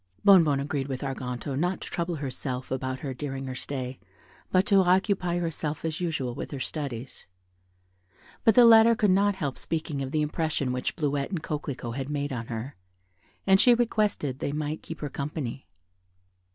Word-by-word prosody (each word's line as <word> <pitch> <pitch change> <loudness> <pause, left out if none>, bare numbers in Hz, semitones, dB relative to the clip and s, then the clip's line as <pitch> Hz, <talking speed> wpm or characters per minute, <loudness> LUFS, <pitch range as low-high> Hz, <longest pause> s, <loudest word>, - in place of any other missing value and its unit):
Bonnebonne 165 -8 +6
agreed 140 -1 -2
with 130 -2 -4
Arganto 130 0 -4
not 180 +6 0
to - - -6
trouble 170 0 -2
herself 130 -2 -4
about 130 0 -2
her 135 -2 -3
during 135 0 -5
her 130 - -4
stay, 130 0 -4 0.5
but 185 +1 +4
to 200 - +4
occupy 185 -1 +3
herself 160 -3 -3
as 160 +2 -3
usual 150 -8 -1
with 130 - -6
her 140 - -5
studies; 130 -3 -5 1.2
but 225 - +5
the 245 - +8
latter 230 0 +8
could 210 -3 +3
not 200 +1 +3
help 145 -8 -3
speaking 155 -3 -3
of 135 - -3
the 150 +2 +1
impression 150 -4 -1
which 125 - -2
Bleuette 145 -4 -1
and 175 -5 -3
Coquelicot 135 -5 -4
had 135 0 -4
made 145 -1 -2
on 115 -2 -4
her, 120 +4 -5 0.7
and 190 0 +6
she 245 -1 +7
requested 210 - 0
they - - -2
might 150 +1 -3
keep 165 - -8
her 150 - -2
company. 140 - -5
145 Hz, 175 wpm, -27 LUFS, 135-175 Hz, 1.2 s, the